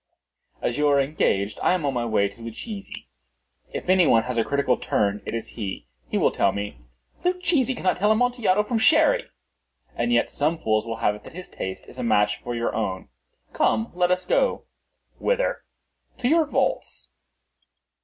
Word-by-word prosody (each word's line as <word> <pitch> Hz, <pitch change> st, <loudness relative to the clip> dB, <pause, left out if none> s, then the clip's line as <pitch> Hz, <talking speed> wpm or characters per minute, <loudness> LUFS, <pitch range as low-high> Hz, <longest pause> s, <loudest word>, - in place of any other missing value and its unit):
"As 120 Hz, -, -1 dB
you 150 Hz, -, +3 dB
are 140 Hz, -1 st, +4 dB
engaged, 110 Hz, -8 st, 0 dB
I -, -, +3 dB
am 180 Hz, -5 st, -1 dB
on 140 Hz, -, 0 dB
my 120 Hz, -1 st, -1 dB
way 105 Hz, -3 st, +2 dB
to 100 Hz, +4 st, -14 dB
Luchesi. 195 Hz, -, -7 dB, 0.6 s
If -, -, -6 dB
any 185 Hz, -2 st, +5 dB
one 115 Hz, -1 st, +4 dB
has 125 Hz, -1 st, -2 dB
a -, -, +3 dB
critical 140 Hz, -2 st, +1 dB
turn, 105 Hz, -2 st, 0 dB
it -, -, -3 dB
is 115 Hz, -1 st, -4 dB
he. 100 Hz, -, -6 dB, 0.2 s
He -, -, 0 dB
will -, -, +3 dB
tell 100 Hz, -, +2 dB
me—" 100 Hz, -11 st, -5 dB, 0.4 s
"Luchesi 345 Hz, -8 st, +1 dB
cannot 185 Hz, -6 st, 0 dB
tell 210 Hz, +3 st, +3 dB
Amontillado 220 Hz, -3 st, +2 dB
from 225 Hz, +1 st, -1 dB
Sherry." 320 Hz, -, +4 dB, 0.7 s
"And 240 Hz, -, 0 dB
yet -, -, +2 dB
some 155 Hz, +3 st, 0 dB
fools 110 Hz, -6 st, 0 dB
will 115 Hz, -, -3 dB
have 105 Hz, -, +4 dB
it 105 Hz, -, -11 dB
that -, -, -12 dB
his 180 Hz, +2 st, -9 dB
taste 95 Hz, 0 st, -6 dB
is -, -, -12 dB
a -, -, -2 dB
match 105 Hz, 0 st, +2 dB
for 120 Hz, 0 st, -4 dB
your 115 Hz, 0 st, -1 dB
own." 95 Hz, -4 st, -3 dB, 0.4 s
"Come, 110 Hz, 0 st, +1 dB
let 180 Hz, 0 st, +1 dB
us 180 Hz, 0 st, 0 dB
go." -, -, +1 dB, 0.6 s
"Whither?" -, -, 0 dB, 0.5 s
"To 245 Hz, -, -1 dB
your 320 Hz, +3 st, +4 dB
vaults." -, -, -2 dB
145 Hz, 185 wpm, -24 LUFS, -, 0.7 s, any